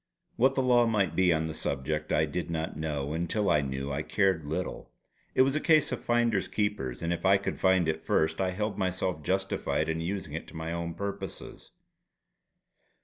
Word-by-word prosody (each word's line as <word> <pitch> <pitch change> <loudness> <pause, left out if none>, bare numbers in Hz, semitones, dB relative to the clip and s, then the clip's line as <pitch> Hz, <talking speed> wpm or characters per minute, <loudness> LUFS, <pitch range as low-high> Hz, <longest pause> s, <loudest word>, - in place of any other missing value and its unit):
What 130 +3 +3
the 130 - +2
law 120 -2 +4
might 100 -7 +1
be 95 0 +4
on 80 -1 +1
the 80 - -4
subject 75 +3 -3
I 75 +1 +3
did 85 +4 -4
not 80 -1 -3
know, 75 -2 -3
and 85 +1 -2
till 105 -4 +1
I 75 -3 +4
knew 70 0 -3
I 70 +2 -1
cared 95 +1 +1
little. 80 +5 -4 0.5
It - - +6
was 135 +2 +1
a - - +2
case 155 -2 +4
of - - -4
"finders 120 -4 +2
keepers," 105 - -2
and 85 +1 0
if 85 - -5
I 95 +1 +5
could 100 - -4
find 95 -3 +3
it 80 - -1
first 80 +3 +1
I 95 - +1
held 105 +2 -3
myself 95 -3 -1
justified 95 +1 -1
in 80 0 -1
using 90 -3 -4
it 80 - -5
to - - -13
my 80 +1 -4
own 85 -1 -3
purposes. 100 +2 -6
85 Hz, 200 wpm, -29 LUFS, 80-100 Hz, 0.5 s, It